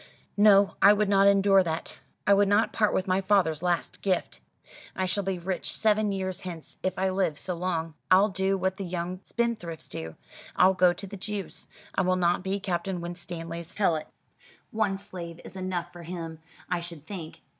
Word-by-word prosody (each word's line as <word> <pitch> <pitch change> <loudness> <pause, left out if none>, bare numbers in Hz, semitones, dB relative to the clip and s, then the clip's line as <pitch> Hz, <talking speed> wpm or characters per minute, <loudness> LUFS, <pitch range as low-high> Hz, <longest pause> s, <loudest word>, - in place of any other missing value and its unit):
"No, 205 -1 +6
I 200 - +8
would 210 -1 +1
not 195 0 +5
endure 195 -1 +5
that. 165 -2 -4 0.3
I 200 - +6
would 200 0 +4
not 205 +3 +3
part 210 -2 +2
with 190 - 0
my 190 0 +1
father's 185 -6 +2
last 175 -1 -1
gift. 185 -3 -1 0.5
I 190 - 0
shall 195 +2 0
be 190 -1 -2
rich 180 +1 -3
seven 215 -1 +2
years 190 -1 -3
hence, 170 -4 -8
if 185 0 -2
I 190 +1 +1
live 185 -6 0
so 180 +5 -3
long. 165 -2 -2 0.2
I'll 195 +3 +6
do 190 0 0
what 190 0 -1
the 195 - -4
young 180 0 -4
spendthrifts 220 -10 -3
do. 80 0 -6 0.4
I'll 185 +1 +5
go 180 -1 +5
to 180 +3 -6
the 200 +1 -8
Jews. 205 +1 -5 0.3
I - - +1
will 185 0 +2
not 175 -1 +2
be 195 +1 -1
Captain 185 -1 -2
Winstanley's 170 -1 -7
helot. 170 -7 +1 0.6
One 210 -3 0
slave 175 -4 -7
is - - -11
enough 180 -2 -3
for 175 - -10
him, 165 -2 -6 0.3
I 180 - 0
should 170 -3 -8
think. 170 -4 -8
185 Hz, 190 wpm, -27 LUFS, 175-195 Hz, 0.6 s, I